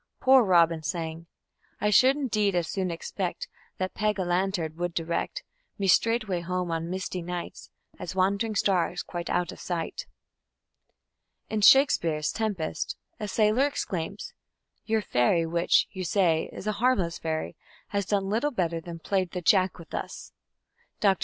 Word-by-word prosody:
"Poor 265 -1 +6
Robin" 170 -4 +4
sang: 160 +2 -4 0.5
I 210 +1 +1
should 260 +6 +6
indeed 215 -9 0
as 175 -2 0
soon 185 0 -2
expect 175 +2 -4 0.3
That 185 0 -3
Peg 210 -1 0
a 190 - 0
lantern 175 -2 -1
would 175 0 -3
direct 170 0 -2 0.3
Me 200 - -2
straightway 215 -1 +2
home 180 0 -2
on 165 0 -2
misty 185 0 -3
night 175 0 -6 0.3
As 180 +1 -6
wand'ring 200 +4 +1
stars, 180 -3 +1
quite 175 -1 -6
out 175 - 0
of - - -12
sight. 175 - -4 1.4
In 215 -1 0
Shakespeare's 170 - +5
Tempest 190 -8 -3 0.2
a 210 - -3
sailor 215 +6 +3
exclaims: 195 - -4 0.5
"Your 220 -1 +1
fairy, 165 +4 +2
which, 170 +1 +3
you 190 -1 -5
say, 170 -3 +1
is - - -9
a 215 - +1
harmless 195 -10 +1
fairy, 160 -1 -3 0.3
has 200 -1 -2
done 200 -2 0
little 225 +9 +1
better 170 - -1
than 170 0 -8
played 185 +2 -1
the 180 - -3
Jack 185 +1 +3
with 170 -2 -13
us". - - -6 0.7
Dr. 195 -3 +3
185 Hz, 155 wpm, -27 LUFS, 170-210 Hz, 1.4 s, Poor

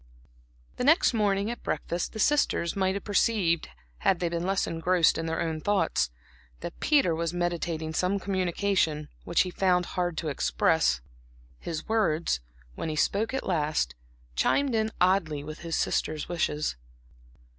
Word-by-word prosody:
The - - -1
next 305 0 +5
morning 205 -1 +1
at 240 - -7
breakfast 170 0 -2
the - - -6
sisters 240 - +2
might 190 -1 +1
have 200 - -4
perceived 200 -5 +1 0.3
had 185 - +2
they 175 - 0
been 170 +1 -2
less 195 0 +1
engrossed 165 +1 +2
in 165 - -3
their 165 0 -1
own 160 -1 -2
thoughts, 205 - +1 0.5
that 170 - -7
Peter 280 - +3
was 165 +1 -2
meditating 170 -2 -2
some 185 +4 +1
communication, 185 -5 0 0.2
which 170 - +3
he 180 - -1
found 180 -1 +2
it - - -10
hard 175 -2 -2
to 160 - -2
express. 65 - +2 0.6
His 160 -2 -5
words, 170 - +1 0.3
when 160 - -4
he 155 - -2
spoke 205 +8 +1
at 265 - -3
last, 150 - 0 0.4
chimed 280 - +2
in 220 -1 +1
oddly 175 -6 +2
with 155 +1 -8
his 165 -1 -3
sisters' 155 -1 -1
wishes. 150 - -1
175 Hz, 155 wpm, -28 LUFS, 160-200 Hz, 0.6 s, next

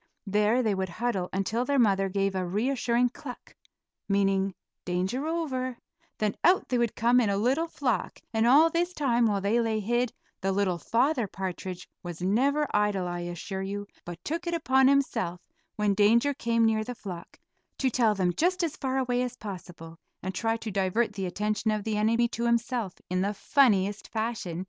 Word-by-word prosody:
There 210 +5 +2
they 215 -3 +2
would 190 -1 -2
huddle 195 -2 -2
until 205 +5 -1
their 280 +2 0
mother 195 -5 +3
gave 195 0 0
a 185 -1 -1
reassuring 235 +5 +1
cluck, 250 0 -10 0.6
meaning 195 -1 +1 0.3
"danger 190 - -1
over," 260 -7 -2 0.4
then 210 -1 0
out 365 +2 +4
they 250 - +1
would 235 -2 0
come 240 +2 +4
in 225 -4 +2
a 200 - +1
little 265 +10 +1
flock, 260 -7 -2 0.2
and 225 +1 +2
all 305 +6 +6
this 350 +2 0
time 245 -7 +2
while 200 -2 0
they 215 +5 +2
lay 225 -1 0
hid, 240 +3 0 0.3
the 195 0 0
little 190 -3 0
Father 245 - +1
Partridge 185 -1 -5
was 175 -2 -7
never 270 +11 +2
idle, 205 -3 +1
I 175 0 -3
assure 175 +3 -5
you, 200 +1 -4 0.2
but 175 -1 -7
took 330 +3 -3
it 340 - 0
upon 265 -4 +3
himself, 240 -10 +1 0.4
when 210 -2 +1
danger 230 +7 +4
came 230 -3 +1
near 220 -1 +2
the 245 +3 -6
flock, 180 -6 -8 0.4
to 260 -2 +1
tell 225 -3 +3
them 180 -2 +1
just 360 - +1
as 320 -3 -2
far 265 -1 -1
away 250 -2 +1
as 250 -1 -3
possible, 175 -5 -9 0.3
and 190 +1 -3
try 225 +3 0
to 225 -1 -6
divert 200 +4 0
the 195 -2 -3
attention 210 +4 -1
of 215 -1 0
the 215 0 -1
enemy 230 +3 +3
to 235 +1 -2
himself 235 -3 0 0.2
in 185 0 +1
the 200 +2 -1
funniest 205 -6 +2
fashion. 220 -7 -3
220 Hz, 185 wpm, -28 LUFS, 195-250 Hz, 0.6 s, all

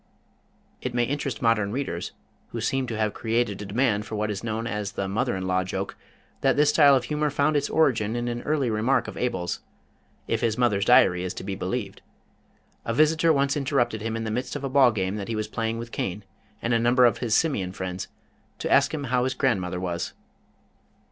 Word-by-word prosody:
It - - -4
may 120 - +3
interest 140 -2 -3
modern 105 -3 +2
readers 115 -9 -3 0.3
who - - -6
seem 135 -1 0
to 115 -2 -4
have 110 -1 0
created 115 -3 -1
a - - -5
demand 105 -1 +1
for - - -5
what 105 0 -1
is 100 0 -5
known 110 0 -2
as 105 -3 -3
the 95 - -2
Mother 110 +4 0
in 95 0 -3
Law 95 0 +1
joke 95 - -4 0.5
that - - +3
this 150 0 +4
style 145 -2 +6
of 130 - +1
humor 150 +4 0
found 145 +2 +1
its 145 - +1
origin 120 -8 +2
in 120 0 -2
an 120 0 -3
early 145 -5 0
remark 115 +5 +1
of - - -7
Abel's, 95 -8 -2 0.7
if - - 0
his 115 -1 0
mother's 105 -5 +2
Diary 120 -8 +5
is 90 - -4
to - - -6
be - - -4
believed. - - -4 0.8
A 115 - -2
visitor 160 +3 +4
once 140 -1 +2
interrupted 130 -6 0
him 115 +1 -3
in 115 - -3
the 110 - -3
midst 125 +5 -3
of 145 - -5
a 135 - -2
ball 130 -2 +5
game 95 -1 -2
that 100 -2 -5
he 115 - -2
was 110 0 -2
playing 115 0 -2
with 115 0 -7
Cain 95 +3 -3 0.4
and 120 - +1
a 115 - +3
number 120 +2 +4
of 120 - +3
his 115 -3 +1
Simian 105 - +1
friends, 95 -1 -5 0.5
to - - -3
ask - - +4
him 145 - -4
how 125 -1 +1
his 130 0 -1
grandmother 95 -10 0
was. 85 -2 -3
115 Hz, 215 wpm, -25 LUFS, 105-135 Hz, 0.8 s, style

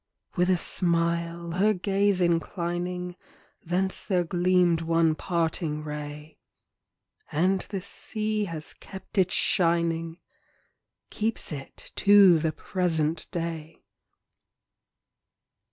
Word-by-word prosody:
With 180 -1 +2
a 185 - +4
smile 170 -1 0
her 205 +5 +2
gaze 195 +1 +1
inclining, 175 +1 -1 0.5
Thence 185 +3 -1
there 180 -3 +2
gleamed 175 -1 +2
one 165 -1 +2
parting 160 -2 -1
ray. 150 0 -7 0.9
And 185 +5 +2
the 195 -3 -4
sea 215 +1 -2
has 165 -4 -7
kept 195 +1 -7
its 185 0 +2
shining 165 -2 +1
â - - -37 0.9
Keeps 220 -3 -2
it 140 -3 -9
to 200 -4 +7
the 160 0 0
present 165 -3 -1
day. 165 -2 -5
170 Hz, 100 wpm, -27 LUFS, 165-185 Hz, 0.9 s, to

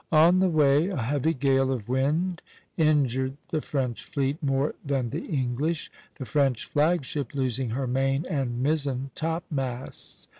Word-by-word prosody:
On 165 +3 +6
the 190 0 +3
way 150 0 +4
a 195 - -3
heavy 145 +6 0
gale 135 0 +2
of 120 -6 -3
wind 155 +8 0 0.3
injured 135 -4 +2
the 155 - -1
French 130 -6 -2
fleet 140 +3 -2
more 135 0 +1
than 135 -5 -1
the 155 +5 -3
English, 145 +3 -1 0.3
the 130 - -5
French 135 -4 +1
flag 155 0 +2
ship 140 -2 -4
losing 130 -2 -1
her 130 +4 -2
main 135 +4 0
and 130 -6 -2
mizzen 140 -3 -1
topmasts. 145 -6 -4
140 Hz, 150 wpm, -26 LUFS, 130-155 Hz, 0.3 s, On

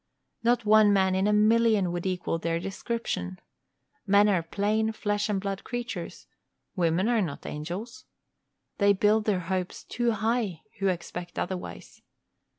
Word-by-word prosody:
Not 235 -1 +2
one 215 0 +6
man 190 -1 +3
in 190 +2 +2
a - - +3
million 215 -2 +4
would 175 +1 -3
equal 180 -2 -2
their 165 0 -1
description. 190 - -4 0.7
Men 200 +1 +5
are 185 -4 +2
plain 210 +6 0
flesh 205 0 -1
and 200 -2 +1
blood 195 0 -4
creatures; 240 -1 -5 0.5
women 175 +2 +1
are 235 -2 +3
not 160 -7 -4
angels. 180 +11 -6 0.7
They 200 -1 +5
build 210 +2 +2
their 195 -4 +1
hopes 185 +1 -3
too 240 -1 0
high 215 -5 -1 0.2
who 195 - +1
expect 175 -1 -4
otherwise. 180 0 -5
200 Hz, 145 wpm, -27 LUFS, 180-220 Hz, 0.7 s, one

